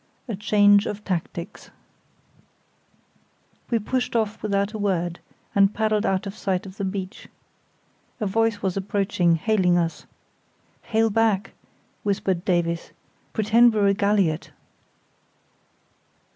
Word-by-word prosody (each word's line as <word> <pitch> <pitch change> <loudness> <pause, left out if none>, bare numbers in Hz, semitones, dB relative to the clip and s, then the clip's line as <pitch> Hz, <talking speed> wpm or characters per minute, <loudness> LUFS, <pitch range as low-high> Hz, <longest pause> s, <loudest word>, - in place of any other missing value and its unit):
A 230 - -3
Change 205 0 +4
of 210 0 -5
Tactics 170 -2 -5 2.0
We 235 - +2
pushed 250 +3 -2
off 220 -1 -1
without 200 0 0
a 215 - -5
word, 175 -4 -1 0.3
and 200 0 +3
paddled 215 -1 +1
out 190 +1 0
of 200 +1 -6
sight 190 -3 -2
of 190 +1 -11
the 200 - -3
beach. 190 -1 -5 0.9
A 215 - -1
voice 225 +1 0
was 190 -2 0
approaching, 195 -3 +1
hailing 180 0 +2
us. 165 -1 -2 0.7
"Hail 225 -1 +1
back," 210 -3 +1 0.5
whispered 190 -3 -1
Davies; 170 -3 -1 0.4
"pretend 225 +2 +4
we're 205 -1 +2
a - - +3
galliot." 200 -5 +1
200 Hz, 115 wpm, -24 LUFS, 185-215 Hz, 2.0 s, Change